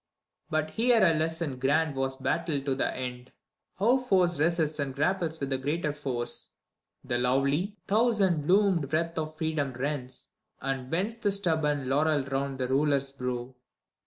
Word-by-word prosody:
But 155 0 0
here 230 -1 +4
a 165 - +5
lesson 160 -3 -1
grand 145 +3 +2
was 135 0 -1
battled 150 -4 -1
to 135 - +1
the 130 - 0
end, 125 0 -6 0.5
How 235 +7 +4
force 185 - +2
resists 155 -1 +1
and 135 -2 -2
grapples 165 +1 0
with 140 0 -3
the 130 - 0
greater 150 +2 -1
force. 120 -5 -4 0.5
The 120 - -1
lovely, 140 - +1
thousand 200 -8 +2
blossomed 185 -7 +3
wreath 165 +1 0
of 155 0 -4
Freedom 155 -4 -1
rends, 130 0 -3 0.3
And 135 -1 -3
bends 200 +9 -1
the 205 -3 +1
stubborn 160 -8 +1
laurel 145 +1 +2
round 135 0 -2
the 130 -1 -1
Ruler's 140 0 +1
brow. 125 -1 -4
150 Hz, 155 wpm, -28 LUFS, 135-170 Hz, 0.5 s, a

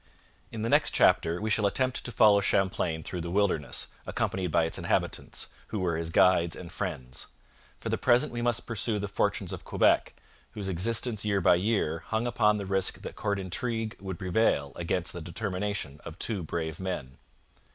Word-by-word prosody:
In 110 -1 -4
the 115 - 0
next - - +3
chapter 85 +1 +4
we 110 +1 -2
shall 105 -1 +3
attempt 130 +5 0
to 125 - -5
follow 105 -2 +6
Champlain 95 -5 0
through 90 - -4
the 85 - -4
wilderness, 95 -5 +1 0.2
accompanied 95 -2 -1
by 80 - +3
its 80 - -2
inhabitants, - - -1 0.2
who 105 - -3
were 90 -3 0
his 80 0 -3
guides 85 -1 +4
and 85 -2 -9
friends. 65 -1 -5 0.5
For - - -5
the - - -1
present 125 +4 +3
we 120 0 -3
must 120 -2 0
pursue 115 -1 -1
the 100 0 -2
fortunes 100 - -1
of - - -7
Quebec, - - +2 0.4
whose 100 -2 -5
existence 110 +4 0
year 100 -2 +1
by 90 -2 +5
year 90 -4 +1
hung 110 +2 0
upon 105 -3 +3
the 100 - -4
risk 95 0 0
that - - -7
court 100 -1 -1
intrigue 110 +4 -3
would 95 -2 -5
prevail 90 -7 +1
against 85 +1 -1
the 85 - -6
determination 90 -4 -4
of 80 - -9
two 105 -3 0
brave 80 0 -4
men. 75 -9 -5
95 Hz, 185 wpm, -29 LUFS, 85-110 Hz, 0.5 s, follow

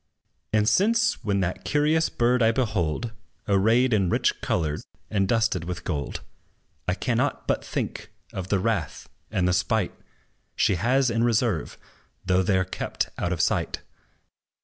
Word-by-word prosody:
And 105 -1 +2
since, 225 - +3
when 100 -2 +1
that 90 0 -2
curious 150 +2 +2
bird 120 +1 +2
I 115 0 +5
behold 110 -4 -1 0.4
Arrayed 110 +5 +3
in 95 -4 +2
rich - - +1
colors, 75 -3 -1 0.3
and 100 -2 +1
dusted 110 -7 +1
with 90 0 -5
gold, 70 -6 -3 0.7
I 90 - +1
cannot 130 +5 -1
but - - 0
think - - -4 0.2
of 95 -1 -4
the 100 - +2
wrath 95 -6 -2 0.2
and 90 -1 +1
the 90 - +2
spite, 105 +2 +1 0.6
She - - +3
has 125 +8 +2
in 115 0 +1
reserve, 115 - +1 0.5
though 95 0 +3
they 95 +1 +2
're 95 - +1
kept 95 - -3
out 85 - -1
of 85 -3 0
sight. - - 0
105 Hz, 150 wpm, -25 LUFS, 90-120 Hz, 0.7 s, I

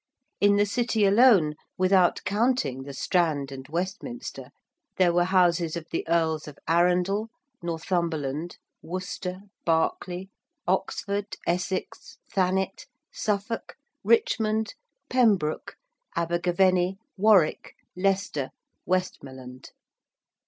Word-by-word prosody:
In 205 0 +5
the 205 0 +4
City 225 0 +1
alone, 200 -7 +5 0.2
without 185 -1 +3
counting 205 - 0
the 140 +1 -8
Strand 150 -4 0
and 135 0 -8
Westminster, 190 - -5 0.5
there 180 -2 +4
were 175 0 +3
houses 175 -3 +2
of 170 -2 -5
the - - -2
Earls 160 -2 +1
of 145 -2 -10
Arundel, 180 +5 +2 0.3
Northumberland, 165 -2 -2 0.2
Worcester, 185 +1 -5 0.2
Berkeley, 175 +3 0 0.4
Oxford, 200 0 -1
Essex, 180 +2 -3 0.2
Thanet, 190 - 0 0.3
Suffolk, 210 +2 -2 0.3
Richmond, 220 - +2 0.3
Pembroke, 205 -11 +1 0.4
Abergavenny, 180 +2 +2 0.2
Warwick, 200 -5 +3 0.2
Leicester, 190 -7 0 0.4
Westmoreland. 130 -8 -3
180 Hz, 90 wpm, -26 LUFS, 165-200 Hz, 0.5 s, In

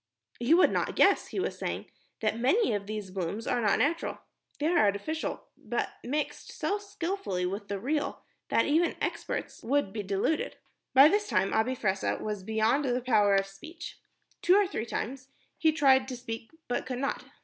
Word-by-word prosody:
"You 245 +8 +4
would 365 - +5
not - - -1
guess," - - +4
he - - -4
was - - -2
saying, - - -3 0.4
"that 215 -1 +1
many 275 - +3
of 200 -1 -3
these 210 -3 -5
blooms 190 +4 -3
are 245 - 0
not 210 -3 +3
natural. 335 +3 0 0.4
They 295 - -2
are 340 +2 +3
artificial 210 +11 0
but - - -3
mixed 290 +4 -3
so 410 - -1
skilfully 385 - -3
with 200 +3 -4
the 200 -1 -3
real 290 +6 -2 0.3
that - - +3
even 325 +4 +2
experts - - -3
would 270 -5 0
be 215 - -2
deluded." 200 +10 -1 0.4
By 270 +3 +10
this 415 +5 +1
time 195 - +1
Abi 225 +4 +1
Fressah 195 -5 0
was 210 -2 -3
beyond 220 +7 +1
the 250 -1 +1
power 215 -5 +3
of 195 0 +2
speech. 320 - -10 0.4
Two 360 - +5
or 410 0 +5
three 235 - -4
times, 255 +3 -4 0.3
he 320 -1 +4
tried 265 -4 +4
to 255 -2 -5
speak 225 -2 -6 0.2
but 245 - -2
could 255 -1 -3
not. 275 +2 -2
250 Hz, 180 wpm, -29 LUFS, 210-310 Hz, 0.4 s, By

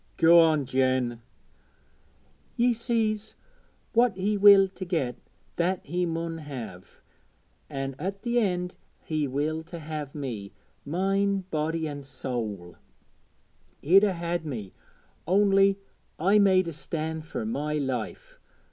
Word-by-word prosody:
'Go 170 +1 +7
on, 155 -4 +4
Jen.' 130 -2 0 1.4
'Ye 240 +1 +4
sees, 220 -2 -1 0.6
what 235 -3 +4
he 205 +3 0
willed 200 -1 +7
to - - -4
get, 160 -9 -1 0.4
that 180 +2 0
he 175 +4 -1
mun 165 0 -3
have, 120 - -9 0.7
an' 135 0 -4
at 195 +4 -4
the 240 0 +1
end 180 -4 -1 0.3
he 155 -2 -1
willed 155 +4 -2
to 170 - -8
have 155 -2 -6
me 115 -9 -5 0.3
mind, 195 +3 0
body, 160 +1 -1
an' 145 -1 -6
soäl. 110 - -5 1.1
He'd 190 +7 +6
'a 200 -2 +3
had 170 -1 -3
me, 115 -11 -6 0.5
only 195 +1 +4 0.4
I 195 +6 +4
made 190 -3 +4
a 165 - -4
stand 160 +1 -4
fur 230 - -4
my 150 -9 -2
life. 130 -6 -4
165 Hz, 125 wpm, -27 LUFS, 140-195 Hz, 1.4 s, Go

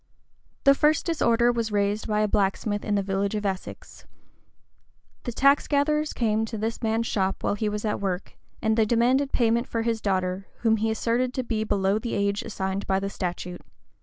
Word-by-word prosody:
The 275 - +7
first 300 +2 +2
disorder 240 -8 +3
was 230 -2 -2
raised 205 +1 0
by 210 -1 +1
a 215 - +2
blacksmith 205 +1 0
in 210 -1 0
a 200 - 0
village 195 +1 -1
of 210 -1 -3
Essex. 190 -2 -6 1.2
The 245 - -2
tax 275 +4 +3
gatherers 300 +1 +1
came 220 -2 0
to 225 0 -6
this 220 +2 -3
man's 225 0 0
shop 195 -3 -1
while - - +1
he 210 +1 -1
was 210 +1 -4
at 210 - -1
work, 190 -1 -3 0.3
and 220 0 +2
they 220 -1 +3
demanded 250 +5 +2
payment 235 0 +2
for 230 -1 -2
his 230 -1 -1
daughter, 190 -1 -1
whom 225 -1 +3
he 220 +1 0
asserted 235 +3 0
to 255 - -1
be 225 -2 -1
below 200 -1 +1
the 235 +1 -3
age 200 0 0
assigned 190 -1 -3
by 190 0 +2
the 195 0 -4
statute. 180 -1 -4
215 Hz, 195 wpm, -25 LUFS, 200-235 Hz, 1.2 s, The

